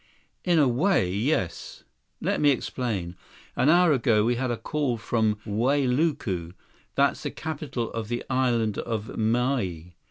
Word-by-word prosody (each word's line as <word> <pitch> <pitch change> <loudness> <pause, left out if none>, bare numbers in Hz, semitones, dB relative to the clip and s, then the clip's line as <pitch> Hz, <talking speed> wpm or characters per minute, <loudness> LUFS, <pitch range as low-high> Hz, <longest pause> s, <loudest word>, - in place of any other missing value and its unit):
"In 175 -2 +2
a 145 -3 +5
way, 125 - +2
yes. 100 - -2 0.4
Let - - 0
me 145 - +5
explain. 110 -9 -2 0.4
An 140 - +3
hour 175 0 +5
ago, 115 -5 +3
we 120 - +2
had 130 +1 -2
a 120 - -1
call 145 -4 -1
from 110 -1 0
Wailuku, 125 - 0 0.4
that's - - +2
the - - -3
capital 145 -6 -4
of 115 -2 -4
the 120 +1 -3
Island 120 -5 +1
of 110 -2 -4
Maui. 110 -7 -1
120 Hz, 145 wpm, -26 LUFS, 110-140 Hz, 0.4 s, a